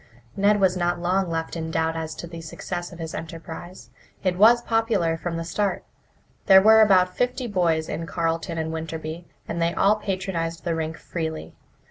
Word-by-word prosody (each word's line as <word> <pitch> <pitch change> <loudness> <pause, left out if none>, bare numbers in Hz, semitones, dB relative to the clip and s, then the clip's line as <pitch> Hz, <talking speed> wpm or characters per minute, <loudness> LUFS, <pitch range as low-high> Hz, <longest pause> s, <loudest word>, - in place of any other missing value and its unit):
Ned 205 +1 +3
was 190 -2 +3
not 175 -1 0
long 180 +1 0
left 165 0 -3
in 160 -1 -4
doubt 160 0 0
as 160 -1 -4
to - - -7
the 170 -1 -8
success 175 +2 -6
of 175 - -10
his 165 -1 -6
enterprise. 165 +2 -8 0.3
It 185 -2 +1
was 230 +5 +6
popular 225 -8 +1
from 165 +1 -4
the 165 - -3
start. 195 +4 -1 0.6
There 190 -1 +9
were 220 +3 +7
about 185 -3 +4
fifty 250 +1 -1
boys 170 -7 +1
in 165 - -4
Carleton 165 0 -2
and 160 0 -2
Winterby, 160 +1 -5 0.2
and 170 - -3
they 170 +1 +1
all 210 +2 +4
patronized 185 -5 -3
the 170 - -1
rink 160 0 -3
freely. 160 -2 -5
170 Hz, 180 wpm, -24 LUFS, 165-190 Hz, 0.6 s, There